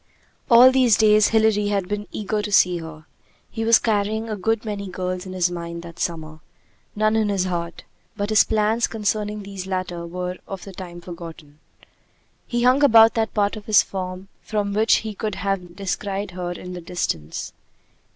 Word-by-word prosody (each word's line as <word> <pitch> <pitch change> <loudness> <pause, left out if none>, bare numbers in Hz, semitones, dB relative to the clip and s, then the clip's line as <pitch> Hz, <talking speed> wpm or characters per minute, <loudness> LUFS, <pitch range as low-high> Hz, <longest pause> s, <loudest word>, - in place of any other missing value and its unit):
All 245 +2 +8
these 255 -4 +4
days 215 -1 +5
Hilary 220 -2 +2
had 200 -3 -1
been 205 +1 -4
eager 210 0 -2
to 210 0 -5
see 180 -2 +4
her. 160 -1 -10 0.5
He 225 - -3
was 230 0 +6
carrying 220 +1 -1
a - - -1
good 225 +3 -1
many 205 -2 -4
girls 185 0 -4
in 185 - -7
his 180 -1 +1
mind 170 -1 -6
that 170 0 -11
summer; 155 -2 -4 0.6
none 215 +1 +2
in 215 -2 +1
his 195 -2 +1
heart; 170 -2 -4 0.3
but 205 +1 -2
his 215 - +6
plans 220 +2 +1
concerning 210 -1 -2
these 195 -1 -7
latter 180 -2 -4
were 180 +1 -5
for 195 - -5
the 195 +1 -11
time 175 -2 -9
forgotten. 165 -4 -10 0.9
He 240 -1 -1
hung 255 +3 +4
about 225 -4 +7
that 225 0 -1
part 205 0 +1
of 210 -1 -10
his 215 -2 +6
farm 185 0 -6
from 205 -2 -2
which 220 +2 +4
he 215 - -4
could 210 0 -4
have 180 -3 -3
descried 195 0 -3
her 180 0 -5
in 180 +1 -7
the 180 - -7
distance. 165 - -4
200 Hz, 180 wpm, -22 LUFS, 180-215 Hz, 0.9 s, All